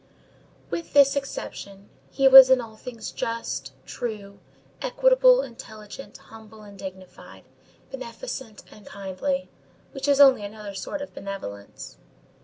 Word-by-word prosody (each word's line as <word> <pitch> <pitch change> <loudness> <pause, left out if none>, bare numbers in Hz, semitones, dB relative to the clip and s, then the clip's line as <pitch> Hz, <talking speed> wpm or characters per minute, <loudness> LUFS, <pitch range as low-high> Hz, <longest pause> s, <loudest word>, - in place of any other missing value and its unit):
With 335 - -5
this 280 -1 +6
exception, 200 -7 -7 0.2
he 270 -1 +2
was 265 -1 +11
in 260 -1 +5
all 225 -2 -8
things 230 0 -8
just, 230 -12 -4
true, 205 -4 -6 0.4
equitable, - - +4
intelligent, 220 0 -11
humble 220 -1 -15
and 205 -1 -13
dignified, 190 -1 -11 0.5
beneficent 260 - -8
and 210 - -15
kindly, 200 +10 -4 0.4
which 270 -1 -5
is 285 -1 +3
only 270 -6 +7
another 205 0 -8
sort 285 +10 -5
of 285 - -11
benevolence. 100 - -8
230 Hz, 120 wpm, -24 LUFS, 200-275 Hz, 0.5 s, was